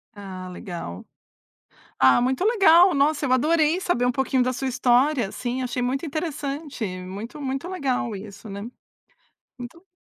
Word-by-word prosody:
Ah, 190 -2 -8
legal. 170 - -7 0.9
Ah, 130 - +5
muito 260 +8 0
legal. 380 -5 +6
Nossa, 290 +1 +2
eu 255 - -1
adorei 310 +5 +3
saber 300 -10 0
um 250 - +3
pouquinho 260 0 +1
da 255 - 0
sua 265 +1 -3
história, 250 -2 +2
assim, 250 +3 -4
achei 250 0 -2
muito 270 +5 -1
interessante, 295 -4 -4 0.2
muito, 200 +9 -8
muito 270 +4 -3
legal 265 - -1
isso, 200 +1 -10
né. 200 +1 -6 1.0
Muito 335 +10 -10
260 Hz, 145 wpm, -24 LUFS, 230-305 Hz, 1.0 s, legal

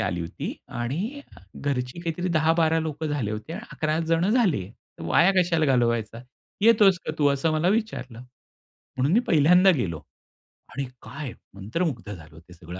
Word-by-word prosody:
आली 90 -5 -1
होती 85 - -5
आणि 175 - -4 0.3
घरची 125 +1 -3
काहीतरी 170 +1 -3
10-12 160 0 +2
लोकं 155 0 -4
झाले 145 -8 -2
होते 110 +8 -6
आणि 215 +7 -7
11 155 0 -1
जण 165 +3 +2
झाले 195 - +2
तर - - -17
वाया 190 - +4
कशाला 170 -3 +1
घालवायचा 120 -4 +1 0.4
येतोस 210 -4 +5
का 155 - -2
तू? 145 - +3
असं 140 +3 +1
मला 155 +3 +1
विचारलं. 190 - -2 0.8
म्हणून 130 +4 +1
मी 225 - +5
पहिल्यांदा 180 +5 +5
गेलो 85 - -2 0.7
आणि 140 - -3 0.2
काय 140 -4 -7 0.2
मंत्रमुग्ध 115 - -3
झालो 80 -3 -13
ते 85 +2 -17
सगळं 85 +1 -10
150 Hz, 155 wpm, -25 LUFS, 115-170 Hz, 0.8 s, येतोस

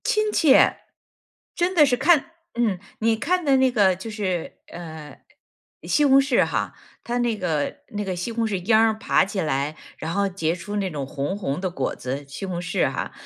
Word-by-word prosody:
亲 430 0 +1
切， 295 -9 +5 0.8
真 350 +2 0
的 305 -3 +7
是 255 - +2
看 320 +3 +3 0.3
嗯， 215 -6 +1 0.2
你 225 0 +2
看 355 +10 0
的 275 -2 +4
那 260 -1 +3
个 200 -6 +3
就 190 +5 -8
是， 190 -6 -3
呃， 160 -4 -9 0.7
西 295 - +2
红 270 -1 +6
柿 275 -2 +3
哈， - - -2 0.3
它 240 +1 -2
那 240 -2 0
个 160 -7 -2
那 210 0 -4
个 190 -2 -3
西 180 +7 -4
红 230 0 -1
柿 205 -3 -1
秧 220 -1 +5
儿 220 -1 +2
爬 220 - +2
起 195 0 -4
来， 145 0 -1 0.2
然 160 +1 -4
后 200 0 +1
结 170 -4 -1
出 180 +4 -7
那 195 -2 -1
种 145 -5 -4
红 145 +7 -3
红 145 -7 -3
的 185 - -1
果 140 -7 -3
子， 135 +3 -5
西 140 +7 -6
红 175 -2 -4
柿 180 +3 0
哈， - - -4
200 Hz, 215 characters per minute, -23 LUFS, 170-240 Hz, 0.8 s, 的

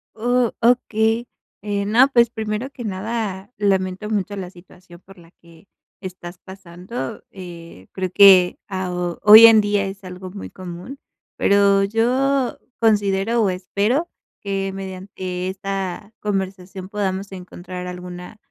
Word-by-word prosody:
Oh, 245 +1 +1
okey. 230 -1 +2 0.4
Eh, 200 0 -2
no, 240 +6 +5
pues, 235 -3 +4
primero 220 +2 -4
que 250 - -9
nada, 205 -1 -4
lamento 195 0 0
mucho 205 -1 -2
la 185 -2 -6
situación 175 -1 -17
por 195 +1 -18
la 170 0 -18
que 170 +2 -19 0.3
estás 180 -2 -8
pasando. 190 +5 -8
Eh, 170 - -11
creo 185 -1 -3
que 190 -3 +7
a 185 -2 -3
o 175 -1 -3
hoy 215 +2 +11
en 225 -1 +8
día 205 -1 0
es 195 0 -7
algo 185 0 -8
muy 200 - -8
común, 185 +9 -9 0.4
pero 200 0 +4
yo 255 +5 +1 0.2
considero, 210 0 +2
o 200 - +2
espero 205 - -1 0.3
que 195 -1 -2
mediante 185 -1 -6
esta 195 +1 -5
conversación 190 -2 -4
podamos 195 -1 -3
encontrar 180 0 -8
alguna 180 +2 -8
195 Hz, 135 wpm, -21 LUFS, 185-215 Hz, 0.4 s, hoy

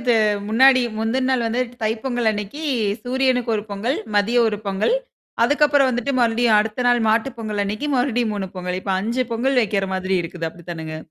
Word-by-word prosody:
இது 240 -1 +2 0.3
முன்னாடி 255 +3 +5 0.2
முந்தின 255 +4 0
நாள் 250 -3 +1
வந்து 235 +3 -1 0.2
தைப்பொங்கல் 230 +1 -1
அன்னைக்கு 210 +9 -5 0.4
சூரியனுக்கு 255 -1 +1
ஒரு 210 - -3
பொங்கல், 220 +7 -2 0.2
மதிய 225 +4 +2
ஒரு 210 -1 -1
பொங்கல். 195 - +1 0.5
அதுக்கப்புறம் 290 +1 +3
வந்துட்டு 245 +3 -2
மறுபடியும் 230 -1 +3
அடுத்த 215 +3 -1
நாள் 245 0 +4
மாட்டு 225 +4 +2
பொங்கல் 210 -2 -2
அன்னைக்கு 210 +8 -3
மறுபடியும் 245 -3 0
3 195 -2 -3
பொங்கல். 180 0 -3
இப்ப 195 - -2
5 235 +5 -1
பொங்கல் 255 +3 +1
வைக்கிற 195 -2 -1
மாதிரி 185 0 -1
இருக்குது 165 -1 -5
அப்டித்தானங்க? 160 -2 -7
225 Hz, 170 wpm, -21 LUFS, 205-255 Hz, 0.5 s, முன்னாடி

